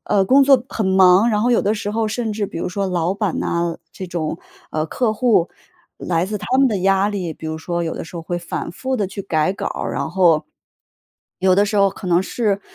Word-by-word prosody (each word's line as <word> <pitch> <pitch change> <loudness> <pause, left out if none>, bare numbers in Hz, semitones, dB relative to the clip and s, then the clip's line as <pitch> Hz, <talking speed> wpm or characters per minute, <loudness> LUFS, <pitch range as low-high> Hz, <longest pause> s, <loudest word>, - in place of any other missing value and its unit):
呃， 195 - +3
工 270 +8 +5
作 270 -3 +5
很 220 - -2
忙， 190 +4 +5
然 210 -1 +1
后 245 - +2
有 240 - +3
的 205 +1 +1
时 210 -1 -3
候 220 0 0
甚 220 +1 -2
至 210 0 -2
比 165 - -7
如 - - -2
说 195 +1 -2
老 180 0 0
板 200 -3 -2
啊， 170 -1 -1
这 185 - -7
种， 165 -2 -3 0.3
呃， 155 0 -1
客 220 +6 -1
户， 220 -8 +2 0.5
来 170 0 -1
自 210 +2 -3
他 260 +6 -1
们 270 -1 +5
的 215 - -1
压 195 +1 +3
力， 185 -5 -3
比 160 - -9
如 160 0 -3
说 170 +2 -3
有 165 -1 -3
的 - - -5
时 165 - -13
候 170 - -4
会 175 +2 -4
反 170 -1 -5
复 260 +9 -3
地 200 - 0
去 195 +1 -7
改 155 -3 +1
稿 - - -4
儿， - - -3
然 - - -2
后。 170 -4 +3 1.0
有 185 -1 +4
的 200 +2 +4
时 210 - -2
候 195 - +5
可 190 - -9
能 175 +1 +3
是。 205 -1 -1
190 Hz, 260 characters per minute, -20 LUFS, 170-215 Hz, 1.0 s, 工